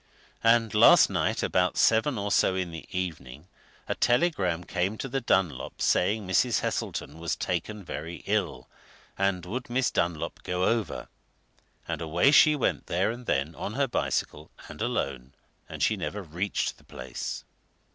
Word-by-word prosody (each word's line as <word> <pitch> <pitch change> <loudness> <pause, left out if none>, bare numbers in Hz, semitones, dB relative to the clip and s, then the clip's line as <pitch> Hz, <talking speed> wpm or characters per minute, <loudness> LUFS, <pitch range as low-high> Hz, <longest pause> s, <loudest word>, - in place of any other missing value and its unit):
And 115 -1 +4
last 105 - +7
night - - 0
about 90 0 +1
seven 115 +4 +3
or 100 0 -2
so 95 - +3
in 90 -2 -2
the 80 -1 -9
evening 80 -6 -5 0.4
a - - 0
telegram 100 - +1
came 95 +5 -2
to 135 - -4
the 135 +1 -2
Dunlops 95 - 0
saying 105 +3 +2
Mrs. 95 - +2
Heselton 75 +3 -3
was 85 -1 -2
taken 105 -2 -3
very 85 0 -7
ill, 95 -11 -1 0.5
and 95 -2 0
would 120 +8 -5
Miss 125 0 +1
Dunlop 85 -2 -1
go 90 0 -2
over? 115 +1 -1 0.8
And - - -3
away 85 - +3
she 150 +1 +7
went 140 - -1
there 95 +5 +1
and 120 +1 -9
then, 70 +3 0
on 100 - -5
her 140 0 +1
bicycle, 80 - -2 0.2
and - - -10
alone 65 -1 -2 0.4
and - - -4
she - - +3
never 105 0 -4
reached 90 +4 -2
the - - -21
place!" - - -6
95 Hz, 155 wpm, -27 LUFS, 85-115 Hz, 0.8 s, last